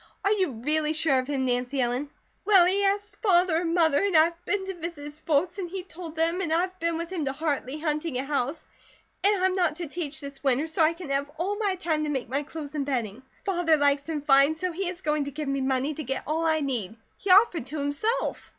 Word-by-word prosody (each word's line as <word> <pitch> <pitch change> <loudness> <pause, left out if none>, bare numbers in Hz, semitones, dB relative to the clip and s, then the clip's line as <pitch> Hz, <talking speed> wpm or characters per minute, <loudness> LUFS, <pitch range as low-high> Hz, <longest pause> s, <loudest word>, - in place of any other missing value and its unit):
Are 400 - +3
you 375 -9 +1
really 300 +6 0
sure 310 -4 +3
of 255 - -4
him, 275 -2 -1
Nancy 250 +2 0
Ellen?" 250 +3 0 0.3
"Well, 390 -4 +6
he 390 +3 +2
asked 405 +1 0
Father 360 -5 +4
and 335 -1 -1
Mother, 320 -2 +3
and 390 -5 +3
I've 335 +2 +2
been 405 -2 -1
to 385 - -4
visit 335 -3 -7
his 295 +1 -9
folks, 335 +6 0
and 355 -3 -4
he 375 +1 -5
told 340 -2 -9
them; 330 +3 +1
and 335 -4 -2
I've 365 +3 0
been 335 0 0
with 335 +1 -5
him 335 -6 -2
to 270 - -1
Hartley 290 -2 -2
hunting 305 -2 -2
a 260 - -1
house; 280 +1 -1 0.6
and 400 -2 +3
I'm 375 0 +3
not 350 -5 +1
to 345 - -4
teach 305 -1 -5
this 280 -1 -9
winter, 270 +2 +2
so 320 0 -1
I 315 +1 +5
can 335 -4 -8
have 280 +1 0
all 380 +5 -1
my 405 -3 +1
time 325 -4 -1
to - - -2
make 265 -5 -3
my 275 +3 0
clothes 295 0 -8
and 295 -2 -1
bedding. 245 -5 -3 0.2
Father 350 -5 +2
likes 285 +1 +1
him 300 -3 -3
fine, 275 +2 +5
so 365 +3 -2
he 360 +2 -2
is 365 +1 -8
going 300 -1 0
to - - -4
give 305 -2 -3
me 275 0 -1
money 265 +2 0
to 310 - -6
get 270 0 -3
all 325 +2 0
I 315 -1 +2
need. 235 -8 -3 0.2
He 400 - -5
offered 365 - +5
to, 310 - -5
himself." 290 +12 -2
315 Hz, 245 wpm, -26 LUFS, 280-355 Hz, 0.6 s, Well